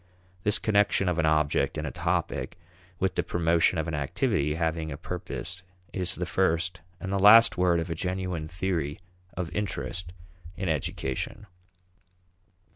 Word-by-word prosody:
This 105 +3 +3
connection 100 -2 +2
of 90 -1 +1
an 80 - +3
object 75 -1 +2
and - - -3
a - - -3
topic - - -2 0.4
with 95 +1 0
the - - +1
promotion 85 0 +2
of 80 +1 -1
an 85 - -3
activity 75 +1 0
having 80 -1 -1
a 70 - -5
purpose 90 +4 -5 0.3
is 90 -2 -1
the 90 - -3
first 85 0 0 0.2
and 95 +1 -4
the 100 - +1
last 115 +4 +8
word 90 -2 +3
of 85 +1 -3
a - - +1
genuine 90 -1 -3
theory 85 -4 -2 0.4
of 90 -3 -4
interest 90 -3 -3 0.5
in 95 +1 -2
education. 75 +5 -2
85 Hz, 150 wpm, -27 LUFS, 80-95 Hz, 0.5 s, last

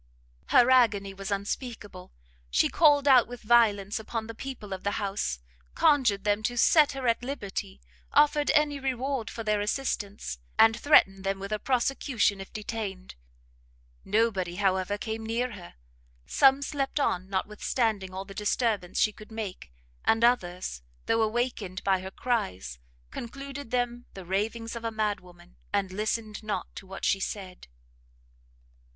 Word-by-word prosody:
Her 250 +1 +5
agony 210 -6 +4
was 195 +1 -7
unspeakable; 200 -1 -5 0.4
she - - +3
called 290 -3 +4
out 255 -4 +7
with 245 0 -9
violence 210 -3 +3
upon 220 0 -4
the 230 - -7
people 225 -5 -7
of 190 - -5
the 205 - 0
house, 200 - -2 0.4
conjured 235 -9 +3
them 205 0 +1
to 245 +3 -2
set 295 +5 +5
her 265 -2 -3
at 230 0 +2
liberty, 200 - -5 0.3
offered 295 0 +4
any 295 -2 +2
reward 265 -2 -2
for 230 - -6
their 210 -1 +1
assistance, 205 - -3 0.2
and 225 0 +6
threatened 195 -8 +4
them 195 0 -1
with 195 +1 -7
a 215 - -1
prosecution 245 -4 +1
if 195 - -10
detained. 205 -3 -5 0.9
Nobody, 200 -5 +1
however, 190 0 +1
came 220 +1 -4
near 235 +3 -1
her: 185 -5 -11 0.5
some 270 +1 +4
slept 280 0 -2
on 185 -8 0
notwithstanding 210 0 -1
all 190 +1 -6
the 195 - -10
disturbance 210 -2 -1
she 215 - +4
could 215 +2 -14
make, 210 - -6 0.3
and 225 +1 +2
others; 180 - +1 0.2
though 225 0 +2
awakened 220 -4 -1
by 190 -1 +2
her 190 +1 -6
cries, 95 - -2 0.3
concluded 275 +2 -7
them 245 0 -2
the 190 -2 -8
ravings 225 +5 -2
of 230 - -6
a 230 - -1
mad 215 -2 -1
woman, 175 0 -18
and 200 -2 0
listened 215 +2 -2
not 215 -1 -4
to 195 - -9
what 195 +1 -6
she 195 - +2
said. 190 - -6
215 Hz, 150 wpm, -28 LUFS, 195-245 Hz, 0.9 s, out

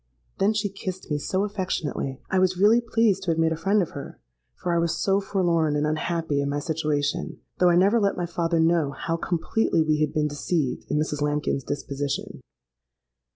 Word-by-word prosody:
'—Then 195 +2 +4
she 215 -1 0
kissed 190 -3 -7
me 150 - +1
so 190 +6 -1
affectionately, 185 -9 -3
I 190 - +3
was 185 -1 +2
really 215 +5 +5
pleased 225 -4 +2
to 185 - -4
have 165 - -1
made 165 0 +2
a - - 0
friend 195 +5 +2
of 170 - -7
her; 140 - -8 0.4
for 175 - -2
I - - +3
was 170 -1 0
so 195 0 +2
forlorn 170 -6 +1
and 150 0 +1
unhappy 155 -1 -1
in 140 - -1
my 145 - -1
situation—though 155 +3 -1
I 175 - +4
never 200 +6 +4
let 200 -2 +1
my 175 - -1
father 170 -1 0
know 165 -2 +3
how 165 +4 -2
completely 170 +1 0
we 155 -1 +1
had 150 -1 +1
been 150 -1 +1
deceived 145 -1 -2
in 150 - 0
Mrs. 150 -1 -1
Lambkin's 145 -2 0
disposition. 140 0 -4
165 Hz, 195 wpm, -25 LUFS, 150-190 Hz, 0.4 s, really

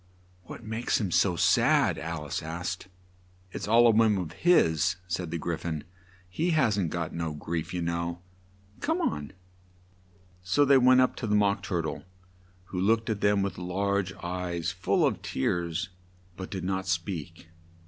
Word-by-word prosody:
"What 115 - -9
makes 110 +2 -1
him 100 -5 -2
so 90 +1 +3
sad?" - - +3
Al 80 -1 -5
ice 75 - -3
asked. 85 +3 -5 0.6
"It's - - -5
all 115 +3 +6
a 115 - +7
whim 110 -2 +4
of 90 -4 -4
his," 90 - +3
said 85 0 -3
the 85 - -3
Gry 85 0 -2
phon; 80 -2 -4 0.4
"he 155 - -1
hasn't 105 - +2
got 80 0 -3
no 80 -2 -3
grief, 80 +3 -4
you 90 -1 -2
know. 85 0 -2 0.6
Come 320 +4 0
on!" 75 - -2 1.1
So 95 +11 +2
they 140 -1 +6
went 130 0 +6
up 130 - +2
to 115 - -3
the 105 - +2
Mock 100 0 +2
Tur 90 -3 -2
tle, 80 -2 -5 0.6
who 90 0 -4
looked 115 +3 +2
at 105 - -3
them 100 -1 +3
with 100 -2 -3
large 95 +2 -1
eyes 90 -2 -3
full - - +1
of - - 0
tears, 85 +4 -2 0.5
but 95 0 -7
did 95 -3 -5
not 95 0 -2
speak. 85 -1 -4
90 Hz, 170 wpm, -28 LUFS, 85-105 Hz, 1.1 s, a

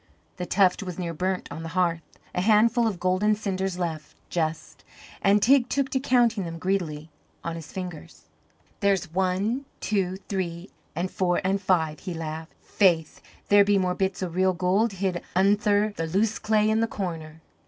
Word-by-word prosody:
The 180 -1 -4
tuft 190 -1 +3
was 180 -3 -6
near 170 -2 -3
burnt 185 +3 -2
on 160 - -6
the 165 - -6
hearth 170 -2 +2 0.3
a 180 - 0
handful 225 +3 +4
of 200 -5 -3
golden 185 +4 +2
cinders 195 -3 -2
left, 160 -4 -4 0.2
just; 160 -2 -3 0.4
and 200 +1 +4
Teig 255 0 +5
took 275 -1 0
to 265 - 0
counting 240 -5 +2
them 165 -1 -6
greedily 165 -4 -2 0.3
on 170 - -3
his 160 -3 -9
fingers. 180 -4 -8 0.5
"There's 195 -5 +1
one, 190 +8 0
two, 190 -3 -1
three, 180 -2 -4 0.2
an' 175 +3 -1
four 180 -2 0
an' 195 +2 +1
five," 160 -5 +1
he 180 -3 -6
laughed. 160 0 -6
"Faith, 170 -6 +2 0.3
there 205 0 +7
be 200 0 +3
more 185 -1 +1
bits 190 0 -1
o' - - -1
real 185 +2 +2
gold 190 +5 +1
hid 190 -2 -2
undther 205 +2 +3
the 165 - -2
loose 205 +6 0
clay 215 -1 +2
in 220 +1 +2
the 230 - +2
corner." 165 -7 -5
185 Hz, 175 wpm, -26 LUFS, 170-205 Hz, 0.5 s, there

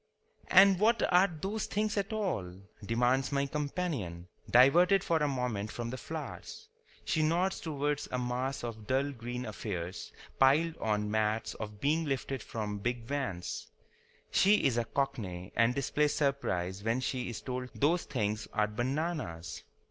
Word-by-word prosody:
"And 195 -1 +7
what 230 +3 +3
are 180 +2 +7
those 195 +6 -4
things 210 +1 -1
at 200 +1 -1
all?" 180 - -2 0.3
demands 125 +5 +1
my 140 0 +1
companion, 140 - -3 0.2
diverted 175 +10 +6
for 165 - +2
a 150 -1 +1
moment 125 -6 -2
from 120 -1 -4
the 130 - -4
flowers. - - -7 0.4
She 155 - +1
nods 175 +5 +1
towards 145 -2 -2
a 125 - 0
mass 125 +2 -2
of 110 -3 -6
dull 135 +2 +1
green 125 0 -5
affairs 95 -4 -5 0.3
piled 155 +5 +4
on 105 -1 -1
mats 110 +1 0
or 110 - -5
being 145 +11 0
lifted 135 -2 -2
from 105 -2 -4
big 120 +2 -2
vans. 115 -9 -3 0.6
She 205 +2 +4
is 135 -4 +3
a 120 -1 +1
Cockney 105 -8 -3
and 115 +2 +3
displays 145 +2 +1
surprise 100 - -1
when 115 +3 +1
she 130 -1 -2
is 115 - -5
told 125 -1 -4
those 165 +5 +2
things 105 -3 -2
are 105 0 +3
bananas. 120 - -3
130 Hz, 150 wpm, -31 LUFS, 110-150 Hz, 0.6 s, And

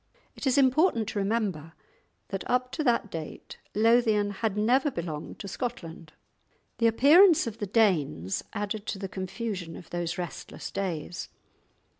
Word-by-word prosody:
It - - -4
is 260 - +3
important 260 - +3
to 205 - -2
remember 195 -7 -1 0.6
that 195 -2 -3
up 250 0 +1
to 310 - -2
that 235 -4 +1
date 160 -2 -7 0.2
Lothian 220 -2 +3
had 210 0 -2
never 250 +7 +3
belonged 165 - -5
to 200 - -7
Scotland. 175 - -6 0.7
The 230 - +4
appearance 310 - +6
of 225 -1 -6
the 205 - -3
Danes 165 - +1
added 210 0 -4
to - - -2
the 195 0 -4
confusion 190 -2 -5
of 170 - -12
those 175 0 -2
restless 175 -2 -6
days. 175 -3 -4
205 Hz, 145 wpm, -28 LUFS, 175-235 Hz, 0.7 s, appearance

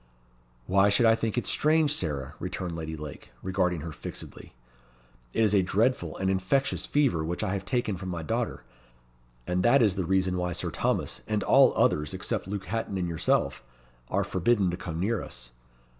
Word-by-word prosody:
"Why 95 +2 +4
should 105 +4 +3
I 115 - +7
think 115 +1 -2
it 120 - 0
strange, 155 -1 +2
Sarah?" 75 - -2
returned 90 -2 -4
Lady 80 -1 -5
Lake, 75 -2 -9
regarding 90 -3 0
her 80 +1 -6
fixedly. 75 - -9 0.8
"It 115 - +1
is 105 -2 +3
a 100 - +5
dreadful 95 -3 0
and 95 - -1
infectious 95 +9 0
fever 135 - +2
which 85 +5 -3
I 100 -2 -1
have 95 -1 -3
taken 110 -3 -1
from 95 0 -6
my 85 -2 -4
daughter; 75 - -2 0.8
and 90 +1 0
that 120 +5 +5
is 105 -4 +3
the 95 - 0
reason 95 0 +1
why 90 0 -1
Sir - - -2
Thomas, - - -1
and 105 -2 0
all - - +6
others, 75 +5 +1
except 100 +1 -3
Luke 100 -1 -4
Hatton 105 +1 -3
and 90 -2 -1
yourself, 85 -2 0 0.5
are - - +1
forbidden 95 0 +1
to - - -2
come 85 -3 -5
near 105 +3 0
us. - - -10
95 Hz, 185 wpm, -28 LUFS, 85-110 Hz, 0.8 s, I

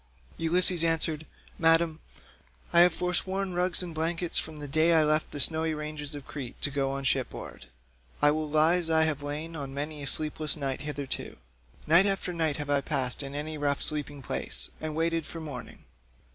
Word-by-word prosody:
Ulysses 175 +1 +4
answered, 160 -1 +1 0.3
"Madam, 165 -1 +3 0.7
I 170 - +6
have 180 +1 +7
foresworn 185 +2 -1
rugs 180 0 +1
and 175 -2 -6
blankets 165 +2 -1
from 155 -1 -6
the 145 -1 -7
day 155 +4 +2
that 165 -2 +5
I - - +3
left 155 +1 +1
the 145 - -6
snowy 160 +1 +3
ranges 150 -1 -5
of 145 -2 -9
Crete 130 -5 -8
to 145 - +3
go 135 -1 -1
on 135 0 -4
shipboard. 130 -1 -2 0.5
I 145 - +5
will 155 0 -2
lie 155 +3 +4
as 170 -2 -3
I 160 0 +4
have 155 -3 -1
lain 150 +3 -5
on 140 -3 -6
many 150 +1 -4
a 140 - -5
sleepless 155 +1 +1
night 135 -3 -3
hitherto. 145 -2 -5 0.5
Night 170 +6 +6
after 195 -2 -1
night 160 -4 0
have 145 -1 -4
I 140 -1 +2
passed 135 -3 -1
in 140 0 -7
any 155 +1 -4
rough 145 -1 0
sleeping 145 -2 -3
place, - - 0
and 155 -1 -4
waited 165 0 0
for 165 - -7
morning. 145 -6 -8
155 Hz, 190 wpm, -28 LUFS, 145-165 Hz, 0.7 s, have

